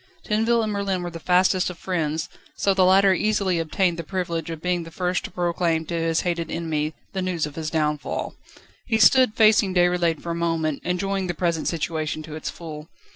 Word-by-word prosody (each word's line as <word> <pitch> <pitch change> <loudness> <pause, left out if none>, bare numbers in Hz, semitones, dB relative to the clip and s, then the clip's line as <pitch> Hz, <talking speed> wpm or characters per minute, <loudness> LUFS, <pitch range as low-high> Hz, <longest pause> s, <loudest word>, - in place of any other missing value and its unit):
Tinville 225 +2 +2
and 215 -1 -2
Merlin 195 -3 -1
were 175 - -4
the 165 - -7
fastest 185 +1 +2
of 180 - -8
friends, 160 -4 -2 0.3
so 200 - +2
the 190 -1 +3
latter 190 +1 +5
easily 195 -2 +1
obtained 170 +1 0
the - - -3
privilege 170 -3 -3
of 165 -1 -5
being 180 +1 -1
the 165 - -8
first 180 +2 -1
to - - -6
proclaim 170 -2 0
to 170 - -6
his 165 -1 +1
hated 170 -2 -2
enemy, 155 -2 -2 0.2
the 190 - -2
news 180 -4 -1
of 150 - -8
his 155 0 -4
downfall. 150 -2 -2 0.5
He 225 - +2
stood 255 0 +5
facing 215 -3 +4
Déroulède 175 -3 +2
for 170 - -3
a - - -1
moment, 165 -3 -1
enjoying 190 +1 -1
the 175 - -3
present 170 -1 -1
situation 155 -1 -2
to 155 0 -9
its 155 - -4
full. 155 -1 -9
175 Hz, 200 wpm, -24 LUFS, 160-190 Hz, 0.5 s, latter